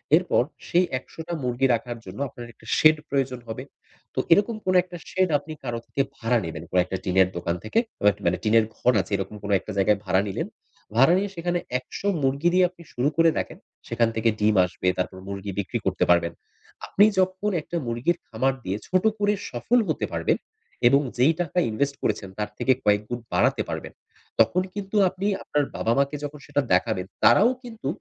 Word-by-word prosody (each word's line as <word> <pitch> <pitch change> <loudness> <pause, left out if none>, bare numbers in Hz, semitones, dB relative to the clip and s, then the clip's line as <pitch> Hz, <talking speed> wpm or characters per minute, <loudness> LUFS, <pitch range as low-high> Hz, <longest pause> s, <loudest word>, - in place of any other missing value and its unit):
এরপর 175 -7 +2 0.2
সেই 180 +1 +3
১০০ - - -19
টা 175 - -3
মুরগি 125 +2 +1
রাখার 120 +1 -3
জন্য - - -9
আপনার 120 -1 -10
একটা - - -21
শেড 155 0 +6
প্রয়োজন 135 -3 -1
হবে? 110 - -5 0.5
তো - - 0
এরকম 205 +5 +2
কোন 185 - +2
একটা 180 -1 -9
শেড 185 -1 +1
আপনি 155 +2 -8
কারো 120 -2 -3
থেকে 140 - -1
ভাড়া 120 +1 +1
নিবেন। 80 -1 -6 0.2
কোন - - -12
টা 95 - 0
টিনের 95 0 +3
দোকান 85 -1 -1
থেকে। 110 - +1 0.2
বা 105 - +2
এক - - -12
মানে 85 +1 +2
টিনের 110 0 +4
ঘন 125 - +3
আছে 100 - -13
এরকম 95 +2 -5
কোন 100 - -3
১ 95 - -9
টা 110 - -3
জায়গায় 100 +1 +3
ভাড়া 95 0 +3
নিলেন। 95 - -3 0.5
ভাড়া 135 +8 +6
নিয়ে 200 +1 -1
সেখানে 175 +1 -1 0.2
১০০ 130 +9 -6 0.2
মুরগি 140 +6 +2
দিয়ে 185 0 +5
আপনি 180 -1 -18
শুরু 130 +4 +1
করে 165 0 +6
দেখেন। - - -3 0.3
সেখান 115 0 +2
থেকে 115 +1 +2
ডিম 105 0 +3
আসবে, 90 0 -4
তারপর 90 0 -2
মুরগি 100 0 -5
বিক্রি 95 - -2
করতে - - +1
পারবেন। 85 -1 +3 0.5
আপনি 205 - +5
যখন 185 +2 +1
১ - - -10
টা 175 - 0
মুরগির 120 +9 0
খামার 130 +4 0
দিয়ে 95 +2 -2
ছোট 185 0 +2 0.2
করে 205 0 +3 0.2
সফল 235 - +2
হতে - - 0
পারবেন - - +1 0.5
এবং 140 +3 +5 0.2
যেই 135 +7 +5
টাকা 175 0 -4
ইনভেস্ট 140 +6 -1
করেছেন 100 - -1
তার 105 0 -1
থেকে 130 - +3
কয়েকগুণ 105 +3 +1
বাড়াতে - - +3
পারবেন। - - -5 0.5
তখন 115 +11 +4
কিন্তু 200 0 -6
আপনি 190 +2 -6 0.2
আপনার 150 - 0
বাবা-মাকে 140 +6 +1
যখন 145 +1 -6
সেটা 145 - 0
দেখাবেন 90 0 +1 0.2
তারাও 225 +5 +6
কিন্তু 225 -3 -7
125 Hz, 195 wpm, -25 LUFS, 105-175 Hz, 0.5 s, শেড